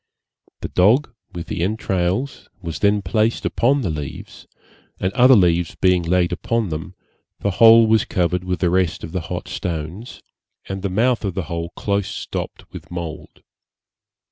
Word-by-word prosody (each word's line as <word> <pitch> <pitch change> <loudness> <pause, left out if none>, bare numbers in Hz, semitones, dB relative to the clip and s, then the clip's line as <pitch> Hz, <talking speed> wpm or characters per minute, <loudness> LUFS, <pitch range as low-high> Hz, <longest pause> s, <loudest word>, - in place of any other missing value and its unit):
The - - -4
dog, 115 +9 +3 0.2
with 85 -1 -6
the - - -4
entrails, 95 +4 -1
was 85 -4 -6
then 105 0 +2
placed 110 +5 0
upon 135 +4 +2
the 95 -9 -1
leaves, 75 -3 -7 0.5
and 95 +1 -1
other 125 +2 +6
leaves 85 -4 +2
being 90 -1 +3
laid 85 +1 +1
upon 115 +3 -1
them, 85 +4 -6 0.5
the 100 - 0
whole 115 +3 +7
was 110 -1 +3
covered 90 0 0
with 90 -1 -3
the 90 -2 +2
rest 90 -3 0
of 80 - -6
the 90 0 -2
hot - - -6
stones, 85 +7 -5 0.4
and 95 0 -5
the 100 - -2
mouth 115 +6 +1
of 95 -4 -3
the 95 - -2
hole 85 +2 -4
close 100 -1 -1
stopped 105 - -6
with - - -10
mould. 85 -3 -7
95 Hz, 165 wpm, -21 LUFS, 85-110 Hz, 0.5 s, whole